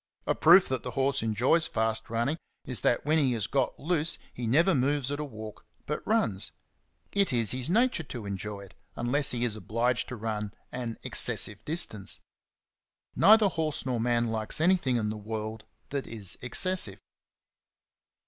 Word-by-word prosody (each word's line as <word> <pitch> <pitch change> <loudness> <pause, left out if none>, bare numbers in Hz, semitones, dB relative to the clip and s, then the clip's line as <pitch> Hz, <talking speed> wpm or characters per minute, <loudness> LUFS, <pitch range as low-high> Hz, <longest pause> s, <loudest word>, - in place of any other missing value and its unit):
A - - +2
proof 175 +4 +6
that 130 -2 -1
the - - -5
horse 135 0 +2
enjoys 125 +9 +2
fast 110 0 -1
running 120 +8 -1 0.3
is 125 -4 -2
that 120 - +1
when 155 +2 +3
he 135 -4 +2
has 110 -4 0
got 135 -3 -1
loose 165 0 +1 0.2
he 120 -2 -4
never 165 +11 +4
moves 140 0 +1
at 145 - -3
a - - -2
walk, 110 -6 -9 0.2
but 150 - -3
runs. 195 - 0 0.6
It 200 -1 +2
is 115 -4 +2
his 130 +2 -2
nature 235 0 +3
to 120 -7 -7
enjoy 100 +1 -5
it, 100 -1 -13 0.2
unless 135 +4 +1
he 120 0 +1
is 110 -3 -1
obliged 115 +5 -1
to 125 - -6
run 105 -2 -4 0.2
an 120 -3 -4
excessive 105 -1 +1
distance. 145 - -1 1.0
Neither 215 0 +7
horse 160 -6 -2
nor 125 -3 -1
man 120 0 +2
likes 110 +3 -2
anything 165 -6 +3
in 105 -2 -1
the 110 - -5
world 110 +1 -5 0.2
that 140 -1 -3
is 105 -6 -4
excessive. 125 - -1
125 Hz, 165 wpm, -28 LUFS, 110-150 Hz, 1.0 s, Neither